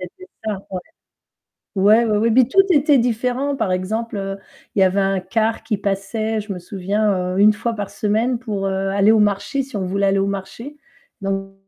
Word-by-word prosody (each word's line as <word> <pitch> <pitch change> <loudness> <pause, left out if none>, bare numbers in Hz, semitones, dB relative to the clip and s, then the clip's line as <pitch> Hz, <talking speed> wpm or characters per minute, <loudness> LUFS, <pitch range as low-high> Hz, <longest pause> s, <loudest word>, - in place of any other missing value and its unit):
C'était 185 - -10 0.2
simple 205 -3 -2
ouais. - - -7
ouais. - - -9 0.9
Ouais, 215 +5 +5
ouais, 215 -2 +1
ouais 230 +2 +2
mais 250 +2 +5
tout 390 - +5
était 290 -3 +4
différent 250 +4 0
par 215 -6 -1
exemple, 215 +5 -2
heu, 195 0 -4 0.4
il 195 - +1
y - - +6
avait 190 +1 +3
un 195 -1 +1
car 220 +4 -1
qui 215 - -1
passait, 210 +3 -2
je 210 0 -6
me 185 - -5
souviens, 190 0 -1
heu, - - -1
1 210 +1 +6
fois 230 +2 -3
par 205 -2 -5
semaine 225 +4 0
pour, 205 -5 -3
heu, 195 0 -1
aller 200 +2 +4
au 220 - +4
marché 205 +7 0
si 260 -4 -8
on 190 - -2
voulait 200 +2 0
aller 195 0 +2
au 195 - +1
marché 200 +9 -6 0.4
donc 195 0 -3
205 Hz, 210 wpm, -20 LUFS, 195-230 Hz, 0.9 s, y